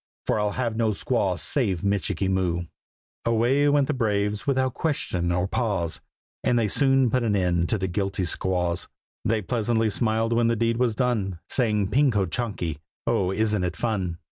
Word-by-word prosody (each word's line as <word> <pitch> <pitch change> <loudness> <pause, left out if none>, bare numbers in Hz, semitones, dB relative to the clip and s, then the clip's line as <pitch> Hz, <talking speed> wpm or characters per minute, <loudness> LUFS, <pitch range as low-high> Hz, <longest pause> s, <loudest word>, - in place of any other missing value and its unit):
For - - +1
I'll 105 -1 0
have 120 -3 -1
no 115 -1 +1
squaw 100 -4 0
save 95 - -1
Michikee 100 -1 0
Moo!" 90 -2 0 0.6
Away 120 +5 +3
went 145 -1 +3
the 150 - -1
braves, 105 -4 -1
without 130 -2 +1
question 90 - -1
or 90 +1 0
pause, 95 -8 -1 0.4
And 120 - +2
they 115 -2 +2
soon 135 0 +3
put 130 - +2
an 110 -3 +1
end 90 -3 +1
to 110 - +2
the 95 -1 -2
guilty 95 +1 -1
squaws; 90 0 -1 0.4
They 110 -1 0
pleasantly 115 +1 0
smiled 115 +2 +1
when 115 0 +3
the 115 - +2
deed 115 +1 +1
was 120 -3 +1
done, 110 -8 0
Saying 105 -6 +1
"Ping 140 +3 +4
ko 105 -5 +1
chanky! 90 - -3 0.3
oh! 95 -1 +1
isn't 105 -1 +1
it 90 -1 -2
fun?" 95 -6 -2
105 Hz, 175 wpm, -25 LUFS, 95-120 Hz, 0.6 s, Ping